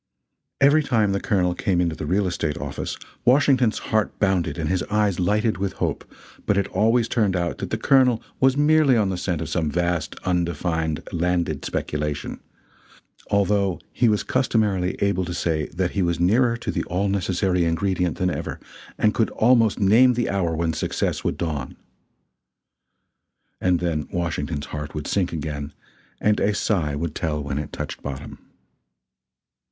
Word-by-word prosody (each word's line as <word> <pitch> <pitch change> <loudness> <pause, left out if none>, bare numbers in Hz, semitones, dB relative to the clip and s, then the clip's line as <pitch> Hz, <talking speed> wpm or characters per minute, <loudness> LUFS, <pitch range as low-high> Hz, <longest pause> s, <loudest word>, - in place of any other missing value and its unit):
Every 145 +3 +5
time 110 -8 +1
the 100 - 0
Colonel 90 -4 +1
came 90 0 0
into 85 -2 0
the 75 - -5
real 95 +5 +1
estate 80 -4 -2
office - - -5 0.3
Washington's 130 -3 +4 0.2
heart 110 -1 +1
bounded 90 -6 +1
and 80 -2 -2
his 90 +3 0
eyes 105 -3 +1
lighted 105 +4 +1
with 95 -1 -2
hope, - - -3 0.4
but 100 - +2
it 100 - +2
always 115 +4 +2
turned 105 -6 +1
out 85 -1 -2
that - - -4
the - - -1
Colonel 130 -4 +4 0.2
was 130 +1 +3
merely 150 -3 +4
on 105 -3 +2
the 95 - -1
scent 90 -3 -2
of - - -4
some 80 -4 0
vast, 85 +1 -1
undefined 85 -3 -1
landed 85 -4 -1
speculation 75 -1 -3 0.9
although 100 -2 +1
he 120 0 +3
was 105 -1 +1
customarily 105 -8 +1
able 100 -2 +1
to 85 0 -4
say 80 -3 -1
that 90 0 -2
he 100 - -1
was 85 -1 0
nearer 115 +7 +3
to 120 - -4
the - - -2
all 95 +3 -1
necessary 95 -1 0
ingredient 90 +1 0
than 90 0 0
ever, - - -5 0.4
and 105 0 +2
could 115 - +1
almost 115 -2 +3
name 115 +5 +5
the 120 -3 0
hour 90 -4 0
when 80 0 0
success - - -2
would - - -1
dawn. 75 -6 -4 1.8
And 90 -1 +2
then 80 -4 -2
Washington's 80 -3 -2
heart 75 0 -5
would 75 -1 -4
sink 95 -3 0
again 75 -2 -5 0.5
and 105 0 +2
a 105 - +1
sigh 80 -11 0
would 80 +1 -3
tell 75 -3 -2
when 70 0 -3
it 75 - -5
touched - - -6
bottom. 70 +1 -7
90 Hz, 165 wpm, -23 LUFS, 80-105 Hz, 1.8 s, Every